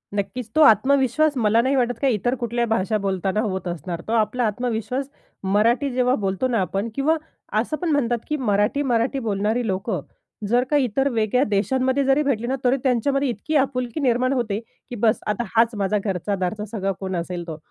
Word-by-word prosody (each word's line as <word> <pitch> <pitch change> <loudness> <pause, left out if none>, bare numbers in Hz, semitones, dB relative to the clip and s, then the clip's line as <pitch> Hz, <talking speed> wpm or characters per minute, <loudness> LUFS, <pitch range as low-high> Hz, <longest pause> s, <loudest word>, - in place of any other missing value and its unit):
नक्कीच, 210 +3 -3
तो 315 - +4
आत्मविश्वास 275 +4 +4
मला 225 0 +3
नाही 265 +3 +1
वाटत 245 -2 0
काही 270 -3 +3
इतर 245 +5 0
कुठल्याही 235 0 -1
भाषा 215 0 +1
बोलताना 195 0 -1
होत 190 -4 -3
असणार. 170 0 -4
तो - - -3
आपला 230 +2 +1
आत्मविश्वास 240 +4 -2 0.3
मराठी 225 +8 +2
जेव्हा 250 0 +2
बोलतो 195 +3 -1
ना 245 -2 0
आपण 195 +5 -2
किंवा 290 +4 +2 0.4
असं 275 +7 -2
पण 350 0 -2
म्हणतात, 245 -5 +1
की 300 - -1
मराठी, 210 +3 +1
मराठी 250 +1 +1
बोलणारी 220 +1 -1
लोकं 190 -2 -2 0.5
जर 245 +1 +3
काही 290 -2 +3
इतर 265 +4 0
वेगळ्या 230 +2 +1
देशांमध्ये 255 +7 +1
जरी 270 +2 +3
भेटली 240 -5 -1
ना, 265 - 0
तरी 255 +1 +3
त्यांच्यामध्ये 275 +2 +1
इतकी 245 +7 -3
आपुलकी 255 -1 0
निर्माण 255 0 +2
होते, 220 -5 -1 0.3
की 245 - -5
बस, 220 -1 +2
आता 210 +3 0
हाच 230 0 +3
माझा 205 +1 +1
घरचा-दारचा 195 +1 -2
सगळा 195 -3 -1
कोण 190 -1 -3
असेल 175 0 -4
तो. 160 - -5
235 Hz, 185 wpm, -23 LUFS, 205-260 Hz, 0.5 s, तो